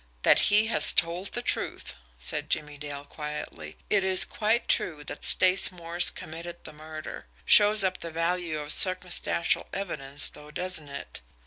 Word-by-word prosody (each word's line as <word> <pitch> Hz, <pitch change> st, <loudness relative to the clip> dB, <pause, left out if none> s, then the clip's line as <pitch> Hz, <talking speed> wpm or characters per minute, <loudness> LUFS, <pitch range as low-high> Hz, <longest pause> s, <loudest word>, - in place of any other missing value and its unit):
"That -, -, +5 dB
he 210 Hz, +1 st, +4 dB
has 225 Hz, -, +2 dB
told 175 Hz, +3 st, -1 dB
the -, -, -4 dB
truth," -, -, -4 dB, 0.2 s
said -, -, -3 dB
Jimmie 150 Hz, -1 st, -3 dB
Dale 145 Hz, -1 st, -8 dB
quietly. 150 Hz, -, -9 dB
"It 200 Hz, -2 st, +1 dB
is 190 Hz, -1 st, +5 dB
quite 220 Hz, +2 st, -1 dB
true 150 Hz, -4 st, -1 dB
that 145 Hz, -, -9 dB
Stace 185 Hz, +1 st, +6 dB
Morse 170 Hz, 0 st, +2 dB
committed 170 Hz, +2 st, -10 dB
the 155 Hz, -, -11 dB
murder. 155 Hz, +1 st, -10 dB, 0.2 s
Shows 210 Hz, 0 st, +5 dB
up 185 Hz, -1 st, -2 dB
the 165 Hz, -, -7 dB
value 165 Hz, 0 st, -3 dB
of 150 Hz, 0 st, 0 dB
circumstantial 185 Hz, -2 st, +2 dB
evidence 145 Hz, -8 st, -2 dB
though, 150 Hz, 0 st, -14 dB
doesn't 160 Hz, -2 st, -5 dB
it? 140 Hz, -, -8 dB
170 Hz, 155 wpm, -26 LUFS, 150-185 Hz, 0.2 s, Stace